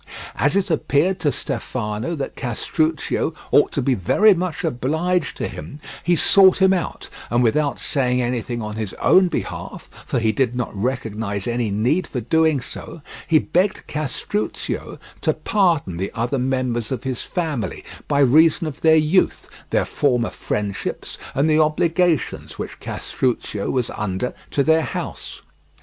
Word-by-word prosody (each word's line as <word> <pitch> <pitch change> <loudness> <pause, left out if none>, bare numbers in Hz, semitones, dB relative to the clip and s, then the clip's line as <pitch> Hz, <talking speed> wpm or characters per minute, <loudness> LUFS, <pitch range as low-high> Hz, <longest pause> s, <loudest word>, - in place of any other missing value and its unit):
As 145 - +3
it 195 -3 +1
appeared 160 +4 +1
to 145 - +1
Stefano 120 +3 -3
that 140 - -5
Castruccio 155 +5 -1 0.2
ought 145 - +5
to 140 - -1
be 135 - +2
very 200 - +4
much 180 0 -3
obliged 160 +4 0
to - - -2
him, 145 - -9 0.2
he 175 0 +3
sought 190 +3 +6
him 190 0 +5
out, 180 -3 -3 0.2
and 120 +2 +2
without 140 +5 +1
saying 125 -3 0
anything 120 -1 -2
on 105 0 -5
his 110 -4 -4
own 185 0 +5
behalf, - - -5 0.2
for - - -1
he 110 -2 +2
did 125 +2 0
not 125 -3 -3
recognize 110 -3 -2
any 120 -2 -1
need 120 - +1
for 125 - -3
doing 160 +3 +2
so, 145 +4 -9 0.2
he 160 - +5
begged 180 +6 0
Castruccio 155 +8 -3 0.2
to - - +2
pardon 170 - +1
the 95 +2 -2
other 125 +3 -1
members 125 -3 -1
of 130 - -3
his 130 -2 -2
family 150 - -3 0.2
by 145 -1 +2
reason 155 +5 +5
of 155 -2 -6
their 160 0 +6
youth, 160 +4 +2 0.2
their - - +1
former 125 -5 +1
friendships, 100 -2 -4 0.2
and 140 +3 +2
the 155 0 +4
obligations 165 +1 +1
which - - -6
Castruccio 115 -5 -2
was 125 -3 0
under 105 +2 -3 0.2
to 140 - +1
their 160 +2 +4
house. - - -6
140 Hz, 155 wpm, -21 LUFS, 120-160 Hz, 0.2 s, sought